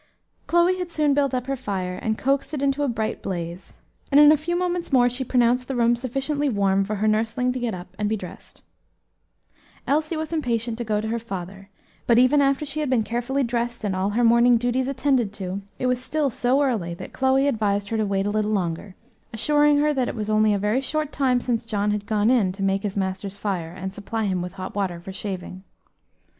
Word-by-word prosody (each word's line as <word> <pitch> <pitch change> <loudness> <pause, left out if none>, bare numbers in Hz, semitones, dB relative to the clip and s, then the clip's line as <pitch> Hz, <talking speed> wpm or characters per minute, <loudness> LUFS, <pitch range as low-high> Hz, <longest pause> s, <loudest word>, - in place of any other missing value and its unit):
Chloe 345 +2 +3
had 360 -1 -3
soon 300 -4 +1
built 280 -2 +2
up 250 -1 -2
her 275 +1 -2
fire 190 -7 -3
and 220 -1 -1
coaxed 275 +3 0
it 280 - -3
into 280 +1 +1
a 290 - +1
bright 220 -3 -2
blaze, 175 -1 -5 0.4
and 280 - +6
in 295 0 +9
a - - +6
few 320 +4 -3
moments 355 -2 -2
more 250 -2 +5
she 255 +2 -2
pronounced 250 0 +2
the 270 - -3
room 240 0 +3
sufficiently 270 +4 -1
warm 195 -3 +2
for 210 +2 -3
her 210 +2 0
nursling 225 +4 +1
to 255 - -4
get 235 -5 -2
up 180 0 -11
and 210 -1 0
be 220 - 0
dressed. - - -11 1.2
Elsie 310 +3 0
was 315 +1 -4
impatient 235 -6 -1
to - - -1
go 210 -2 0
to 220 - -4
her 235 +1 -1
father; 195 -2 -7 0.4
but, 235 - +5
even 255 +4 +5
after 275 +2 +1
she 295 +2 -3
had 300 -3 -1
been 250 -4 +2
carefully 240 +5 -1
dressed 235 -1 -2
and 200 -3 -1
all 190 +2 0
her 230 +4 +1
morning 235 +1 +5
duties 245 +2 0
attended 265 -5 +1
to, 190 -1 -5 0.2
it - - -3
was 250 0 +1
still 290 +1 0
so 255 +5 +2
early 205 -11 -1
that - - -9
Chloe 265 +1 +2
advised 205 -5 0
her 225 - -1
to 215 - +1
wait 195 -1 0
a 205 - 0
little 215 0 0
longer, 185 -1 -2 0.4
assuring 295 +5 +3
her 300 +1 +2
that 260 -3 0
it - - -4
was 215 -1 -3
only 215 0 +4
a 205 - +2
very 210 +6 0
short 305 +2 -2
time 255 -3 +2
since 240 -1 -1
John 210 -2 -1
had 205 -1 -3
gone 215 +1 +2
in 220 -8 +3
to 195 +1 -5
make 195 0 +1
his 205 -1 -4
master's 190 +1 -3
fire 185 -6 -3
and 190 +1 -6
supply 215 +2 -3
him 185 -3 -1
with 180 0 -5
hot 185 0 -7
water 190 -4 -2
for 190 +3 -9
shaving. 185 -2 -6
235 Hz, 225 wpm, -24 LUFS, 200-270 Hz, 1.2 s, in